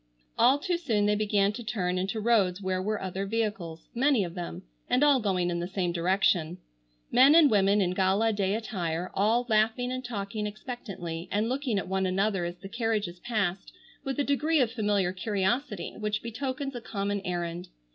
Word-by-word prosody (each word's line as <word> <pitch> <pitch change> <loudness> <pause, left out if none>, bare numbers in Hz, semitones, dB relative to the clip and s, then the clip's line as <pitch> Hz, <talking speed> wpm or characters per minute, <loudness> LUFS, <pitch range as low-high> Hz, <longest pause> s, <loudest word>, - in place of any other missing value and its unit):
All 250 +4 +5
too 350 +4 -1
soon 225 -11 0
they 210 - +3
began 205 -1 +2
to 240 +2 -7
turn 185 -5 -1
into 195 +4 -2
roads 205 -5 +2
where 185 -1 -1
were 210 +2 -1
other 190 +1 -4
vehicles, 205 -7 -3
many 260 -2 +3
of 170 -2 -5
them, 175 - -6 0.3
and 260 - +3
all 290 -3 +5
going 185 -5 0
in 170 - -2
the 175 - -3
same 185 -2 -1
direction. 175 -1 +1 0.5
Men 270 +5 +7
and 320 -4 +7
women 200 0 +4
in 180 -2 +1
gala 195 +4 +2
day 200 -1 0
attire 180 -6 -3
all 225 +5 +2
laughing 225 +3 +1
and 255 0 -4
talking 210 -3 -4
expectantly 195 -7 -6
and 210 +3 +1
looking 260 -4 -1
at 195 - -2
one 190 0 0
another 190 0 0
as 175 0 -4
the 195 - -9
carriages 215 -5 -2
passed 200 -4 -2 0.3
with 270 -1 -3
a - - +3
degree 300 +3 +1
of 245 -4 +2
familiar 205 -6 0
curiosity 205 +2 -1
which 210 0 -2
betokens 265 +4 -4
a 245 - -6
common 200 -2 -2
errand. 175 -1 -3
205 Hz, 185 wpm, -28 LUFS, 185-235 Hz, 0.5 s, Men